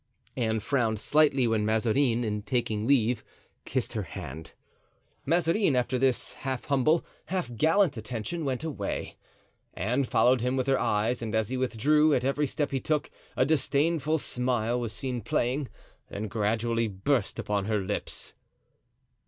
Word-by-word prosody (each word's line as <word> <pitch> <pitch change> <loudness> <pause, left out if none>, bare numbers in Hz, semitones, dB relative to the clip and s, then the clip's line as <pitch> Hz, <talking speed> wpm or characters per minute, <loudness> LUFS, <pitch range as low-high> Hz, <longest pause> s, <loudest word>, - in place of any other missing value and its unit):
Anne 110 -3 0
frowned 115 -4 0
slightly 140 +1 +3
when 110 -2 +1
Mazarin, 115 +3 +2
in 105 -2 -2
taking 110 -2 -1
leave, 125 -4 +2 0.4
kissed - - -1
her - - -1
hand. 80 +5 -8 0.7
Mazarin, 170 +1 +2
after 125 +1 +1
this 130 -2 +1
half 130 -2 -4
humble, 145 +4 +2 0.2
half 180 -9 -3
gallant 160 - +3
attention, 115 +9 -4
went 135 -1 -2
away. 160 -3 -4 0.6
Anne 120 +9 0
followed 125 0 +3
him 125 +2 0
with 130 - 0
her 135 -1 +2
eyes, 110 +4 0
and 110 -1 -3
as 110 -1 +1
he 130 - -2
withdrew, 145 +5 +3
at 125 - 0
every 145 +2 +1
step 145 +2 -2
he 135 - 0
took, 150 +3 -1 0.3
a 130 - +4
disdainful 155 +1 +1
smile 125 -4 0
was 120 -3 -3
seen 125 +3 -3
playing, 125 +5 0 0.4
then 105 +2 -4
gradually 115 +2 0
burst 105 +4 -1
upon 100 -2 -1
her 110 0 +1
lips. 100 +1 -3
125 Hz, 150 wpm, -28 LUFS, 110-140 Hz, 0.7 s, a